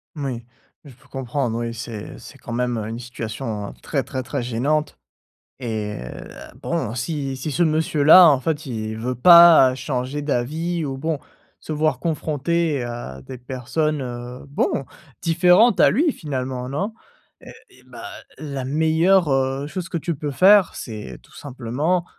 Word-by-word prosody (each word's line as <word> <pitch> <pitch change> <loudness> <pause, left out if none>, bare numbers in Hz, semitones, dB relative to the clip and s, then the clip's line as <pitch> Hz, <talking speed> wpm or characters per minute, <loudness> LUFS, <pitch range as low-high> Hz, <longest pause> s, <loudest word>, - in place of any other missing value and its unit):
Moui, 130 -6 -4 0.4
je 140 -4 -13
peux 125 - -24
comprendre 130 -2 -3
oui, 115 0 -3
c'est 115 -2 -7
c'est - - -13
quand - - -10
même, 120 0 -1
heu, 110 -1 -4
une 115 +1 -5
situation 110 -3 -5
très 140 -4 -2
très 130 -2 -5
très 130 0 -3
gênante 140 +6 -1 0.6
et 110 -4 -4 0.6
bon 130 -10 -2
si 135 +1 -3
si 150 +4 -4
ce 175 - -1
monsieur-là 155 +1 +6
en 140 -4 +4
fait 155 +2 -2
il 110 -4 -4
veut 125 +3 -2
pas 165 -1 +8
changer 130 +1 -3
d'avis 155 +6 -2
ou 135 -1 -4
bon 155 +1 -2 0.4
se - - -8
voir 155 +1 0
confronté 160 -2 -1
à 120 - -7
des 125 - -9
personnes, 135 +5 -2
heu, 125 0 -7
bon, 140 -1 -1 0.4
différentes 180 +7 +4
à - - +6
lui 300 - +2
finalement 130 - -4
non? 195 - -3 0.5
Heu - - -11 0.2
et - - -21
bah - - -9 0.3
la 140 -4 -5
meilleure, 160 +4 +3
heu, 135 +1 0
chose 185 +2 -5
que 175 - -3
tu 170 +2 -3
peux 145 0 -4
faire 190 +5 +5
c'est 110 -3 -7
tout - - -23
simplement 145 +7 -2
140 Hz, 155 wpm, -22 LUFS, 125-160 Hz, 0.6 s, pas